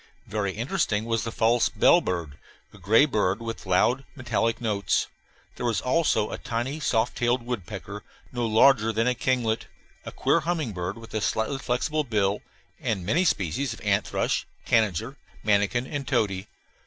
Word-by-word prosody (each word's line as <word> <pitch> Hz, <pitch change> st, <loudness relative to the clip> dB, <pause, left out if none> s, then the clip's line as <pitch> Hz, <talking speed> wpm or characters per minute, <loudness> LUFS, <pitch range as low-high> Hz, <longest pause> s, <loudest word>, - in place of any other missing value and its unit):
Very 100 Hz, -2 st, -2 dB
interesting 110 Hz, -1 st, -1 dB
was 115 Hz, -2 st, 0 dB
the 115 Hz, -, -3 dB
false 115 Hz, +1 st, +2 dB
bellbird, 90 Hz, -, +2 dB, 0.3 s
a 105 Hz, -, -14 dB
gray 110 Hz, -, +5 dB
bird 105 Hz, -7 st, 0 dB
with 115 Hz, -4 st, -6 dB
loud, 120 Hz, +8 st, +3 dB
metallic 115 Hz, -3 st, 0 dB
notes. 105 Hz, -4 st, 0 dB, 0.5 s
There -, -, -3 dB
was 115 Hz, -5 st, +1 dB
also 130 Hz, -, +1 dB
a -, -, -5 dB
tiny 125 Hz, +5 st, -3 dB
soft 115 Hz, -5 st, +1 dB
tailed 120 Hz, 0 st, +1 dB
woodpecker, 105 Hz, -3 st, -5 dB, 0.3 s
no 120 Hz, -2 st, -1 dB
larger 115 Hz, 0 st, +5 dB
than 115 Hz, +1 st, 0 dB
a 125 Hz, -, +3 dB
kinglet; 120 Hz, -2 st, 0 dB, 0.4 s
a -, -, -7 dB
queer 165 Hz, -, +2 dB
humming 165 Hz, -6 st, -2 dB
bird 90 Hz, +2 st, -4 dB
with 115 Hz, 0 st, -12 dB
a 110 Hz, -, -1 dB
slightly 110 Hz, +6 st, -1 dB
flexible 140 Hz, +4 st, 0 dB
bill; 105 Hz, -5 st, 0 dB, 0.4 s
and 95 Hz, -6 st, -2 dB
many 155 Hz, -, +2 dB
species 115 Hz, -, 0 dB
of -, -, -16 dB
ant 105 Hz, -1 st, +1 dB
thrush, -, -, -1 dB, 0.2 s
tanager, 110 Hz, -7 st, +1 dB, 0.3 s
manakin, 105 Hz, +4 st, +2 dB
and 140 Hz, -1 st, -5 dB
tody. 95 Hz, -4 st, 0 dB
115 Hz, 160 wpm, -26 LUFS, 105-125 Hz, 0.5 s, gray